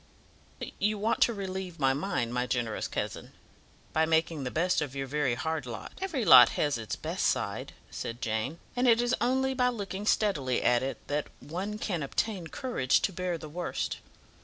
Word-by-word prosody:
"You 210 +1 +1
want 215 +3 0
to - - +5
relieve 190 -3 -5
my 135 -1 +3
mind, 135 -6 -2
my 125 0 0
generous 120 -3 -1
cousin, - - -4 0.6
by 160 0 +3
making 160 -2 +1
the 125 - -2
best 170 +4 +1
of 140 -2 -4
your 135 0 -2
very 135 -2 0
hard 160 0 -2
lot." 120 - -6
"Every 325 - -1
lot 130 -8 +10
has 145 -1 +2
its 110 - -4
best - - -3
side," - - -1 0.2
said 115 +1 -5
Jane, 110 +7 -2 0.2
"and 250 +1 +2
it 230 -1 +6
is 240 +1 +1
only 265 +2 +2
by 250 -1 +2
looking 205 -3 -4
steadily 145 - +1
at 120 -1 +4
it 135 +1 -5
that 145 0 -1
one 185 +10 -4
can 180 -6 -2
obtain 180 +5 -2
courage 200 - +1
to 195 - 0
bear 180 -1 -2
the 155 - -8
worst. 175 +4 -3
165 Hz, 185 wpm, -29 LUFS, 135-210 Hz, 0.6 s, lot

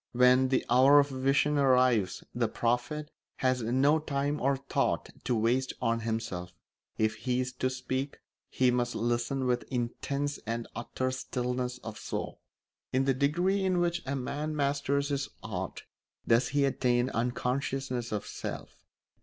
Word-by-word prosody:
When 125 +1 +5
the 130 - +1
hour 130 +4 +7
of 140 0 +3
vision 135 +2 +2
arrives 125 -7 +3
the 120 -1 +1
prophet 125 +7 -1 0.2
has 130 -1 +1
no 135 +7 +3
time 145 -1 -1
or 135 +1 +2
thought 135 +1 -1
to 125 - +1
waste 120 +4 +1
on 115 0 +1
himself; 110 -6 -3 0.4
if 110 0 +2
he 125 -1 -1
is 125 0 -2
to 130 - +2
speak, 130 +2 -3 0.3
he 130 -1 +3
must 120 0 0
listen 120 +3 0
with 125 -1 +1
intense 140 +3 -2
and 115 0 -2
utter 130 +2 -2
stillness 125 -1 -2
of 110 -1 -7
soul. - - -5 0.5
In 130 +1 +2
the 135 - +3
degree 175 +9 +1
in 185 -2 +2
which 175 0 +1
a 140 - -1
man 145 +4 -3
masters 140 0 0
his 140 -1 -1
art 95 -4 -5 0.4
does 115 +1 +4
he 145 0 +2
attain 125 -1 +1
unconsciousness 125 +1 -1
of 105 -1 -2
self. - - -7
130 Hz, 150 wpm, -30 LUFS, 120-140 Hz, 0.5 s, hour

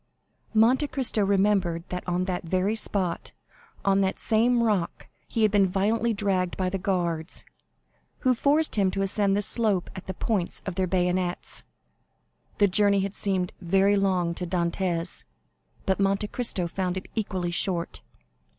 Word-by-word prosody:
Monte 245 +7 +4
Cristo 260 -6 +1
remembered 195 -4 +2
that 180 0 -4
on 180 +1 0
that 185 -1 -3
very 185 +5 0
spot, 190 -5 -1 0.5
on 195 0 +3
the 190 0 +1
same 235 +2 +2
rock, 205 -7 -1 0.2
he 225 - -1
had 215 - +4
been 200 -2 +4
violently 215 +5 +1
dragged 195 -4 0
by 185 -1 -1
the 195 - -2
guards, 175 -3 -1 0.8
who 255 -2 +3
forced 290 +3 +2
him 195 -2 +3
to 195 +1 -1
ascend 195 0 +1
the 205 - +1
slope 210 -5 0
at 190 - -9
the 190 - -4
points 195 -5 -1
of 190 - -3
their 185 +1 0
bayonets. 180 0 0 1.0
The 205 - +5
journey 200 +1 +3
had 195 0 -3
seemed 190 -4 -1
very 195 +3 +3
long 185 -4 +1
to 180 +1 -5
Dantès, 170 -1 -1 0.6
but 190 -1 +1
Monte 195 +1 +1
Cristo 230 -7 -1
found 180 +1 -2
it 185 - -6
equally 190 -5 -2
short. 175 -1 -1
195 Hz, 155 wpm, -26 LUFS, 180-210 Hz, 1.0 s, The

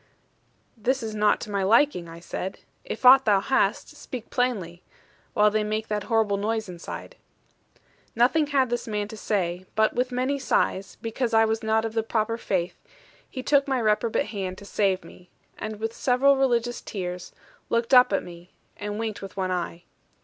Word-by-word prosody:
'This 255 +3 0
is 220 -1 -4
not 210 0 +2
to 215 - -7
my 200 -1 0
liking,' 200 - +3
I 165 0 -10
said: 185 +2 -5 0.3
'if 225 - -6
aught 265 +1 +9
thou 205 -2 +4
hast, 265 +7 +1
speak 245 -3 -8
plainly; 195 -9 -1 0.5
while 210 0 +5
they 215 0 +1
make 215 +1 -3
that 210 -1 -2
horrible 220 -4 +2
noise 220 +1 -1
inside.' 175 -1 -8 1.0
Nothing 270 +7 +3
had 270 -4 +1
this 240 - -2
man 210 -2 -2
to 220 - -8
say; 185 -4 -2
but 220 +1 +3
with 250 +1 -1
many 260 +3 -1
sighs, 195 -6 0
because 230 +1 -1
I 225 0 +6
was 220 0 -1
not 220 0 +1
of 225 - -4
the 225 - +1
proper 225 +1 -1
faith, 185 -5 -2 0.5
he 255 - -6
took 285 0 +3
my 265 -2 +1
reprobate 225 +4 +1
hand 190 -3 -4
to 200 - -11
save 195 -2 0
me: 180 0 -15 0.3
and 215 -1 -5
with 225 +1 -3
several 265 +3 +3
religious 240 -3 +1
tears, 180 -3 -5 0.4
looked 235 +2 0
up 250 -3 +7
at 195 - +1
me, 175 0 -12 0.2
and 205 0 -4
winked 220 -2 -4
with 195 0 -9
one 185 -1 -1
eye. 175 -1 -3
220 Hz, 180 wpm, -25 LUFS, 195-240 Hz, 1.0 s, aught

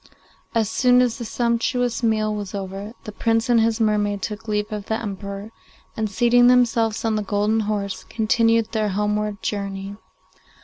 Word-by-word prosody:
As 225 -2 +2
soon 250 +4 +4
as 250 -1 +1
the 235 - -4
sumptuous 240 +1 0
meal 215 -2 +1
was 205 -2 -5
over, 195 +2 -6
the 215 - -7
Prince 225 +2 0
and 235 -2 +5
his 225 0 +1
mermaid 205 -2 +1
took 215 +2 -5
leave 210 0 -1
of 210 -1 -5
the 220 - -1
Emperor, 200 0 -6 0.4
and, 220 -1 -1
seating 240 +4 +4
themselves 235 -3 +3
on 220 -1 +1
the - - 0
golden 210 +2 +1
horse, 205 -2 -2
continued 230 0 +1
their 215 -2 0
homeward 210 +1 -1
journey. 200 -1 -4
215 Hz, 165 wpm, -22 LUFS, 205-230 Hz, 0.4 s, and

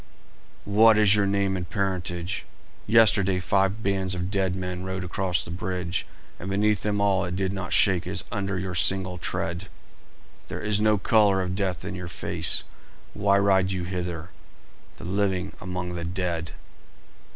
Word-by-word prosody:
"What 110 +2 +6
is 105 -2 +6
your 100 -1 +2
name 100 -1 +1
and 90 -2 -4
parentage? 90 -2 -2 0.4
Yesterday 100 -4 +4
five 95 +3 +1
bands 95 -1 0
of 90 +1 -3
dead 95 -2 0
men 90 -1 -4
rode 95 0 -3
across 90 -2 -1
the 85 - -8
bridge, 90 0 -3 0.3
and 95 - -6
beneath 105 +2 +2
them 105 -1 -1
all 100 -2 +2
it 90 0 -3
did 95 0 -1
not 95 -2 -5
shake 95 -4 +3
as - - -2
under 100 -1 -2
your 95 0 -3
single 90 +1 0
tread. 85 +2 -3 0.8
There - - -5
is 105 -1 0
no 105 0 +4
colour 100 -2 +3
of 90 0 -3
death 95 -3 -2
in 100 - -4
your 90 -1 -6
face. 85 - 0 0.5
Why 100 -1 +3
ride 95 -2 +3
you 95 -2 -2
hither, 90 -2 -4 0.7
the - - -11
living 95 0 -1
among 90 -1 -4
the 85 -1 -4
dead?" 85 -2 -3
95 Hz, 160 wpm, -26 LUFS, 90-100 Hz, 0.8 s, What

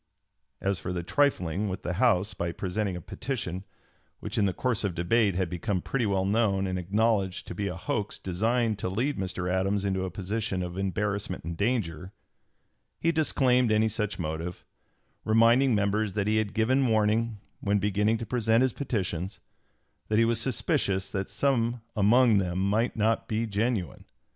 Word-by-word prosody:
As 100 -2 -1
for 90 +2 -3
trifling 100 - +1
with 95 - -5
the 90 - -2
House 105 -5 +3
by 85 -3 -2
presenting 95 +2 -2
a 90 - -6
petition 100 - -4 0.5
which - - -5
in 100 - +3
the 95 - +2
course 115 +4 -1
of 95 -4 -1
debate 100 +3 +2
had 95 -1 0
become 90 +3 -2
pretty 120 +5 -1
well 95 -1 +1
known 100 -2 +2
and 95 -1 -2
acknowledged 100 0 0
to - - -6
be 100 +3 -2
a 90 - -3
hoax 100 +2 -3
designed 110 +4 0
to 90 - -2
lead 120 +7 -1
Mr. 95 -1 -3
Adams 95 +2 0
into 95 -1 0
a 95 - -2
position 95 +1 -3
of 90 0 -5
embarrassment 100 0 -2
and 85 +1 -4
danger, 95 -4 -1 0.9
he 165 - +2
disclaimed 125 -6 +2
any 110 +1 +3
such 105 -1 -2
motive, 80 +1 -4 0.6
reminding 115 +3 +4
members 105 0 0
that 100 -1 0
he 110 +1 +2
had 110 -2 -1
given 130 +4 +3
warning, 110 0 +1 0.2
when 100 0 +1
beginning 105 +2 +1
to 115 - -5
present 115 +1 +2
his 130 -3 +1
petitions, 95 - -3 0.7
that 110 - +1
he 115 - +5
was 115 0 +1
suspicious 110 - 0
that 95 -2 -3
some 120 -3 +1 0.2
among 110 +1 +5
them 90 -2 -2
might 105 +5 +1
not 110 +1 +1
be 110 +1 -1
genuine. 105 -2 -2
105 Hz, 170 wpm, -28 LUFS, 95-115 Hz, 0.9 s, he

